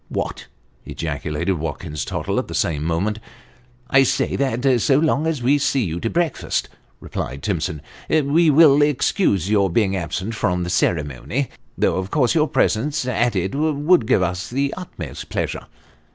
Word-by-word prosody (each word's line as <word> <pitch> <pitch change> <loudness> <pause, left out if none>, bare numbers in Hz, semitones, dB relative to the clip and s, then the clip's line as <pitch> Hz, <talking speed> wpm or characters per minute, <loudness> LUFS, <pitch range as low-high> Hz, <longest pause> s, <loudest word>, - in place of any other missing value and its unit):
" - - -39
What! - - -6 0.2
" - - -37
ejaculated 80 +3 -3
Watkins 75 -1 -4
Tottle - - -2
at - - -4
the - - -6
same 75 -3 0
moment. 95 +7 -1 0.4
" - - -31 0.3
I 130 - +6
say 135 - +1
that 130 -2 +1
so 135 +3 +3
long 155 0 +1
as 155 -7 -2
we 140 +4 +3
see 140 -2 +1
you 85 -3 -3
to 115 - -2
breakfast," 170 -1 -1 0.3
replied 65 +2 -5
Timsoi>, 75 - -2 0.5
" - - -2
we 165 +1 +5
will 150 -1 +6
excuse 145 - +2
your 100 -2 +3
being 95 +1 +1
absent 95 +4 -3
from 90 -5 0
the 85 - -3
ceremony, 85 - -1 0.3
though - - +1
of 95 0 -3
course 125 -2 +2
your 155 -1 +3
presence 145 +5 0
at 120 -2 0
it 95 +1 -1
would 150 -2 +2
give 95 - +3
us 90 +1 -3
the 140 +3 -1
utmost 80 - -8
pleasure." - - -3
115 Hz, 175 wpm, -21 LUFS, 85-140 Hz, 0.5 s, I